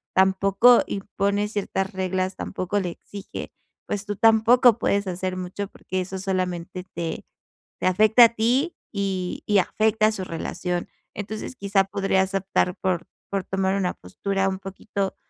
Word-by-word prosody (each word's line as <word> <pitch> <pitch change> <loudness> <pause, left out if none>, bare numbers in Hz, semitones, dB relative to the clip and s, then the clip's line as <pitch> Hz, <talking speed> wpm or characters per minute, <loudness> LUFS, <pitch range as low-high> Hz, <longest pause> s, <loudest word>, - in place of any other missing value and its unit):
tampoco 195 +5 +5
impone 200 +1 -1
ciertas 195 -2 -2
reglas, 185 0 -1
tampoco 185 +3 -2
le 185 -3 -2
exige. 200 +3 -8 0.4
Pues 205 0 -3
tú 205 0 -3
tampoco 225 +2 +5
puedes 200 -2 +1
hacer 185 0 -3
mucho, 185 +2 -4
porque 185 -2 -4
eso 190 +1 -5
solamente 185 -2 -2
te 165 -1 -3 0.6
te - - +1
afecta 215 +5 +7
a - - +4
ti, 255 +10 +1 0.2
y 190 -3 -2 0.2
afecta 215 +2 +2
su 195 -3 -4
relación. 175 +1 -3 0.3
Entonces, 215 +4 -5
quizá 200 -3 +2
podrías 195 -1 0
optar 190 -1 0
por 180 -3 0 0.3
por 195 -1 -1
tomar 195 0 0
una 185 -2 0
postura 195 - -2
un 190 - -3
poquito, 195 0 -4
195 Hz, 140 wpm, -24 LUFS, 185-205 Hz, 0.6 s, afecta